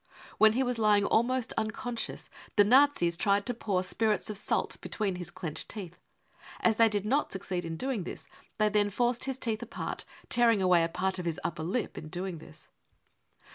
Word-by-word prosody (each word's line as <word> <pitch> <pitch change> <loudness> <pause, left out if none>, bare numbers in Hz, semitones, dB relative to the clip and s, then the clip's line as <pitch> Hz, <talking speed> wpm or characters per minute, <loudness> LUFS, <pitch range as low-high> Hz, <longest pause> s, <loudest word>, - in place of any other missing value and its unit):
When 220 0 +7
he 260 +3 +1
was 250 -2 -2
lying 210 -2 +4
almost 240 +3 +1
unconscious 230 +2 -3 0.3
the 205 - +7
Nazis 245 -7 +4
tried 200 +2 +1
to 245 - -1
pour 200 -5 -1
spirits 215 +3 0
of 210 - -1
salt - - -1
between 200 -4 -2
his 175 -1 -6
clenched 170 -3 -4
teeth. 180 -5 -8 0.6
As 220 -1 +3
they 230 -1 +6
did 205 -1 -1
not 275 +7 +1
succeed 185 -2 -3
in 165 -1 -4
doing 255 -5 -2
this, - - -8 0.3
they 215 -1 +3
then 205 -1 +2
forced 240 +3 0
his 265 -1 -3
teeth 225 -3 -2
apart, 240 - -5 0.2
tearing 235 -3 +4
away 180 -3 +4
a 165 - 0
part 185 +2 -1
of 175 - -4
his 165 - -2
upper 170 -2 -3
lip 190 +9 -2
in 155 - -9
doing 175 +1 -4
this. - - -14
210 Hz, 190 wpm, -30 LUFS, 180-235 Hz, 0.6 s, When